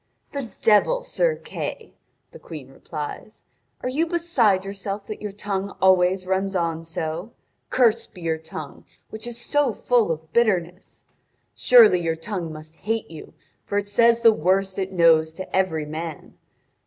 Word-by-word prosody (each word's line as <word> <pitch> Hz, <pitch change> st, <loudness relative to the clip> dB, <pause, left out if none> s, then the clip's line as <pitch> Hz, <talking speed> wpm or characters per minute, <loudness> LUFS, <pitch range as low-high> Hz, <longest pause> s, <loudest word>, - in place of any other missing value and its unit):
"The 275 Hz, -5 st, -5 dB
devil, 485 Hz, -, +4 dB
Sir -, -, +1 dB
Kay," -, -, -6 dB, 0.4 s
the 485 Hz, -, -12 dB
Queen 150 Hz, -, -10 dB
replies, 150 Hz, +9 st, -8 dB, 0.4 s
"are 250 Hz, -, -1 dB
you 310 Hz, +6 st, 0 dB
beside 270 Hz, -, +2 dB
yourself 200 Hz, +1 st, -5 dB
that 215 Hz, -, -7 dB
your 210 Hz, -1 st, -4 dB
tongue 200 Hz, -1 st, -4 dB
always 185 Hz, 0 st, +4 dB
runs 190 Hz, +1 st, -1 dB
on 165 Hz, -2 st, -1 dB
so? 165 Hz, +5 st, -5 dB, 0.4 s
Cursed 230 Hz, -4 st, +2 dB
be 180 Hz, -, -11 dB
your 160 Hz, -1 st, -1 dB
tongue 155 Hz, -2 st, -9 dB, 0.3 s
which 220 Hz, +2 st, -7 dB
is 235 Hz, -1 st, -7 dB
so 275 Hz, 0 st, +1 dB
full 235 Hz, -4 st, +2 dB
of 160 Hz, 0 st, -6 dB
bitterness! 185 Hz, -6 st, 0 dB, 0.5 s
Surely 225 Hz, -7 st, +6 dB
your 165 Hz, -1 st, 0 dB
tongue 170 Hz, -1 st, -5 dB
must 155 Hz, +1 st, -11 dB
hate 225 Hz, -3 st, -3 dB
you, 160 Hz, -, -11 dB, 0.3 s
for 205 Hz, -, -3 dB
it 205 Hz, 0 st, -1 dB
says 235 Hz, +2 st, +4 dB
the 230 Hz, -1 st, +7 dB
worst 190 Hz, +2 st, 0 dB
it 190 Hz, 0 st, -2 dB
knows 160 Hz, -3 st, +4 dB
to 185 Hz, -, -6 dB
every 170 Hz, -5 st, +1 dB
man. 155 Hz, 0 st, -7 dB
195 Hz, 155 wpm, -23 LUFS, 165-225 Hz, 0.5 s, the